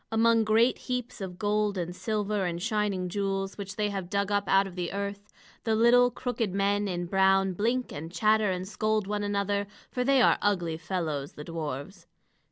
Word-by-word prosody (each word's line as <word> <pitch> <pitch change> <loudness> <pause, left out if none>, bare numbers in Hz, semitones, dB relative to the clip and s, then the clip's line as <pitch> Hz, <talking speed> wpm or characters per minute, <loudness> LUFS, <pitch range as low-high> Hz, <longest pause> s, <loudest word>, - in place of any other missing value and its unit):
Among 225 0 +4
great 225 +3 +3
heaps 250 -3 -4
of 180 -2 -6
gold 210 -1 0
and 175 0 -3
silver 210 -1 -1
and 170 -2 -2
shining 205 -3 -1
jewels, 195 +1 -2
which 195 -2 -7
they 210 -1 0
have 190 -3 -4
dug 200 +1 0
up 205 0 +1
out 195 +1 +4
of 190 -2 -9
the 180 -2 -3
earth, 200 +1 -5 0.3
the 220 -1 +1
little 245 +2 +5
crooked 240 -6 -3
men 200 +1 +1
in 175 -2 -2
brown 195 +1 +3
blink 235 +7 0
and 160 +3 -7
chatter 215 +2 +3
and 185 0 -3
scold 215 0 0
one 205 +1 -2
another; 200 0 -1 0.2
for 250 - -1
they 275 +1 +4
are - - +5
ugly 175 -6 0
fellows 155 -4 -3
the 150 - -8
dwarfs. 165 +2 -6
200 Hz, 185 wpm, -28 LUFS, 185-215 Hz, 0.3 s, little